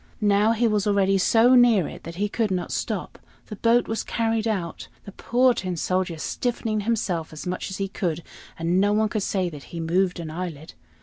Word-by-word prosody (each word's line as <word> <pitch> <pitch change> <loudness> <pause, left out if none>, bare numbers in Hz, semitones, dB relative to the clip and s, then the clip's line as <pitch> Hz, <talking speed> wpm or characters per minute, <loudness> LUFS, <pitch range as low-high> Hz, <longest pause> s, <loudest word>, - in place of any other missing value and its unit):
Now 210 +1 +3
he 230 +1 +2
was 210 -2 +1
already 195 -1 +3
so 230 +6 +5
near 240 -8 +5
it - - -9
that 165 +1 -7
he 205 +3 0
could 220 +1 -1
not 180 -2 -2
stop. - - -3 0.3
The 210 - -8
boat 230 +3 +2
was 225 - -2
carried 225 -1 -1
out, 185 -7 -3 0.2
the 200 - -8
poor 250 +5 +2
Tin 185 -5 -4
Soldier 180 0 -1
stiffening 225 +4 -2
himself 200 -7 -1
as 155 - -8
much 180 +2 -3
as 190 - -5
he 195 - -2
could, 170 -4 -3 0.3
and 170 +3 +1
no 205 +1 +3
one 215 0 +2
could 215 - -2
say 190 -1 0
that 145 -4 -10
he 170 - -8
moved 180 +2 0
an 160 -2 -6
eyelid. 160 -3 -6
195 Hz, 205 wpm, -24 LUFS, 175-225 Hz, 0.3 s, so